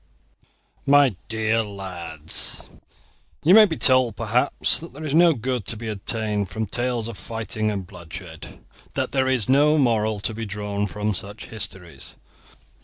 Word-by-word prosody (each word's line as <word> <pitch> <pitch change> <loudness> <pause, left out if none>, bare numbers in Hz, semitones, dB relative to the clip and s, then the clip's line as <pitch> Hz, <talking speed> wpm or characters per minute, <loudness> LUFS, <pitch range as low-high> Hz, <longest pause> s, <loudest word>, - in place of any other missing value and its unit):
MY 140 -5 +5
DEAR 110 0 +1
LADS, 90 -7 -3 0.8
You 170 - +6
may 215 +1 +10
be 165 -6 -3
told 130 -4 +5
perhaps 115 +6 +1
that 165 - -10
there 150 +3 -9
is 150 -3 -3
no 170 0 +6
good 125 -1 -2
to 115 - -3
be 115 +1 -6
obtained 105 -1 -2
from 110 0 -3
tales 120 +1 -1
of 115 -3 -8
fighting 110 -1 -3
and 100 -3 -3
bloodshed, 85 -1 -10 0.3
that - - -1
there 130 -1 +1
is 130 -5 +1
no 145 +4 +5
moral 110 -6 +2
to 110 - 0
be 110 0 -5
drawn 105 0 -2
from 105 +1 -2
such 100 +2 -7
histories. 95 -5 -7
110 Hz, 155 wpm, -23 LUFS, 100-130 Hz, 0.8 s, may